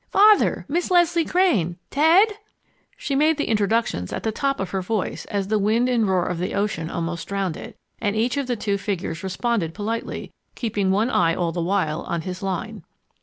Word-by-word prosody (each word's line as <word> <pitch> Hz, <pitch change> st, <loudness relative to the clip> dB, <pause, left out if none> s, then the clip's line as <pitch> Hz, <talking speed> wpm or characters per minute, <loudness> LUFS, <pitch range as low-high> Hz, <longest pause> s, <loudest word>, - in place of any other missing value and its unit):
Father 420 Hz, +1 st, +4 dB
Miss 335 Hz, +5 st, -1 dB
Leslie 345 Hz, -2 st, +3 dB
Crane! 220 Hz, -, +2 dB
Ted 330 Hz, +9 st, +5 dB, 0.4 s
" -, -, -39 dB
She 280 Hz, -, -3 dB
made 305 Hz, +3 st, +3 dB
the 295 Hz, -, 0 dB
introductions 210 Hz, -, 0 dB
at -, -, -4 dB
the 220 Hz, -, 0 dB
top 275 Hz, +4 st, -1 dB
of 190 Hz, -, -3 dB
her 190 Hz, -, -1 dB
voice 205 Hz, +2 st, -3 dB
as 200 Hz, -1 st, -3 dB
the 215 Hz, -1 st, +2 dB
wind 220 Hz, +5 st, +2 dB
and 235 Hz, -4 st, +2 dB
roar 185 Hz, -2 st, +2 dB
of 180 Hz, -, -3 dB
the 180 Hz, -, -2 dB
ocean 200 Hz, -5 st, -1 dB
almost 170 Hz, 0 st, -4 dB
drowned 195 Hz, -4 st, -2 dB
it, -, -, -9 dB, 0.2 s
and 205 Hz, -1 st, -1 dB
each 235 Hz, +2 st, +1 dB
of 280 Hz, -2 st, -2 dB
the 245 Hz, -, 0 dB
two 200 Hz, -2 st, -1 dB
figures 180 Hz, -5 st, -3 dB
responded 190 Hz, -2 st, -1 dB
politely, 220 Hz, +2 st, -4 dB, 0.2 s
keeping 205 Hz, -5 st, -1 dB
one 215 Hz, +6 st, +2 dB
eye 165 Hz, -5 st, +3 dB
all 170 Hz, -2 st, -1 dB
the 170 Hz, -, -3 dB
while 170 Hz, -3 st, 0 dB
on 170 Hz, -, -3 dB
his 180 Hz, +2 st, -6 dB
line. 200 Hz, +3 st, -4 dB
205 Hz, 200 wpm, -23 LUFS, 180-245 Hz, 0.4 s, Ted